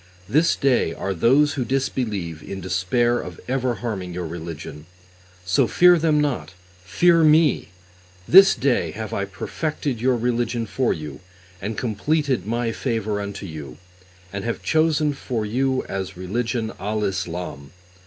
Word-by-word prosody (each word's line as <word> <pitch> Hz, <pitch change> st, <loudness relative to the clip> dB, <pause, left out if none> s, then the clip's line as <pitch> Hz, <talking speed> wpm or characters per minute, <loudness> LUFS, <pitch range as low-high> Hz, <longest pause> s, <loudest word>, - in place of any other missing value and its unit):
This 155 Hz, -, +3 dB
day 125 Hz, -11 st, +1 dB
are 95 Hz, -, -3 dB
those 135 Hz, -, +3 dB
who 130 Hz, -, -1 dB
disbelieve 115 Hz, -, -2 dB
in 95 Hz, -, -7 dB
despair 95 Hz, +7 st, +1 dB
of -, -, -8 dB
(ever 130 Hz, -1 st, 0 dB
harming) 95 Hz, -6 st, -4 dB
your 90 Hz, -1 st, -3 dB
religion; 80 Hz, -2 st, -7 dB, 0.6 s
so 90 Hz, +1 st, +3 dB
fear 180 Hz, -1 st, +6 dB
them 155 Hz, -2 st, +2 dB
not, 140 Hz, -10 st, -2 dB, 0.3 s
fear 165 Hz, -, +4 dB
Me! 155 Hz, -2 st, +4 dB, 0.6 s
This 195 Hz, +2 st, +8 dB
day 135 Hz, -2 st, +1 dB
have 110 Hz, -1 st, -6 dB
I 100 Hz, -, -1 dB
perfected 130 Hz, -, -4 dB
your 125 Hz, 0 st, +2 dB
religion 120 Hz, 0 st, -1 dB
for 125 Hz, +3 st, 0 dB
you 75 Hz, -3 st, -5 dB, 0.4 s
and 105 Hz, +3 st, -4 dB
completed 130 Hz, -, 0 dB
My 115 Hz, +1 st, -1 dB
favour 110 Hz, -4 st, -2 dB
unto 100 Hz, 0 st, -6 dB
you, 75 Hz, -7 st, -8 dB, 0.6 s
and 100 Hz, 0 st, -4 dB
have 115 Hz, -, -3 dB
chosen 155 Hz, -2 st, +2 dB
for 120 Hz, -5 st, -3 dB
you 130 Hz, +4 st, 0 dB
as 95 Hz, -1 st, -5 dB
religion 115 Hz, +4 st, -2 dB
al 105 Hz, +1 st, -2 dB
Islam. 90 Hz, -7 st, -4 dB
115 Hz, 145 wpm, -23 LUFS, 95-135 Hz, 0.6 s, This